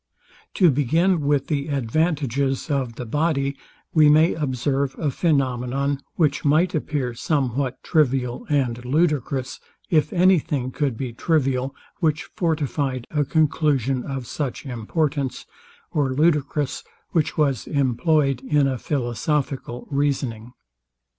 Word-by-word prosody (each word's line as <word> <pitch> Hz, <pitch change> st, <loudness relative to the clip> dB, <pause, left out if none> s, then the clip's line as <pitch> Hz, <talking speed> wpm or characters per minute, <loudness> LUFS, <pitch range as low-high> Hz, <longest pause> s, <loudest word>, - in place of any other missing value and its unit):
To 180 Hz, -5 st, +5 dB
begin 160 Hz, +7 st, +2 dB
with 145 Hz, -1 st, +1 dB
the 145 Hz, -2 st, -2 dB
advantages 140 Hz, 0 st, 0 dB
of 130 Hz, -5 st, -1 dB
the 125 Hz, -, -6 dB
body; 140 Hz, +1 st, 0 dB, 0.4 s
we 155 Hz, -2 st, +6 dB
may 155 Hz, +3 st, +5 dB
observe 135 Hz, -1 st, -1 dB
a 155 Hz, -, -1 dB
phænomenon, 135 Hz, -2 st, 0 dB, 0.2 s
which 150 Hz, -4 st, +1 dB
might 155 Hz, +5 st, +3 dB
appear 145 Hz, -5 st, -2 dB
somewhat 135 Hz, -1 st, -1 dB
trivial 130 Hz, -6 st, +1 dB
and 125 Hz, -5 st, 0 dB
ludicrous, 140 Hz, -2 st, 0 dB, 0.3 s
if 155 Hz, -3 st, +3 dB
any 185 Hz, 0 st, +5 dB
thing 130 Hz, -3 st, -3 dB
could 135 Hz, -4 st, -1 dB
be 125 Hz, -2 st, -4 dB
trivial, 135 Hz, -2 st, 0 dB, 0.2 s
which 160 Hz, -3 st, 0 dB
fortified 145 Hz, -6 st, -1 dB
a 150 Hz, -2 st, +1 dB
conclusion 140 Hz, -3 st, +1 dB
of 135 Hz, -2 st, -5 dB
such 140 Hz, +1 st, -4 dB
importance, 135 Hz, +3 st, -2 dB, 0.5 s
or 140 Hz, -3 st, +1 dB
ludicrous, 150 Hz, -1 st, +1 dB, 0.3 s
which 160 Hz, -3 st, 0 dB
was 140 Hz, -7 st, +1 dB
employed 140 Hz, 0 st, +1 dB
in 150 Hz, -2 st, +2 dB
a 130 Hz, -2 st, -1 dB
philosophical 130 Hz, 0 st, -2 dB
reasoning. 135 Hz, -5 st, -1 dB
140 Hz, 120 wpm, -23 LUFS, 130-155 Hz, 0.5 s, we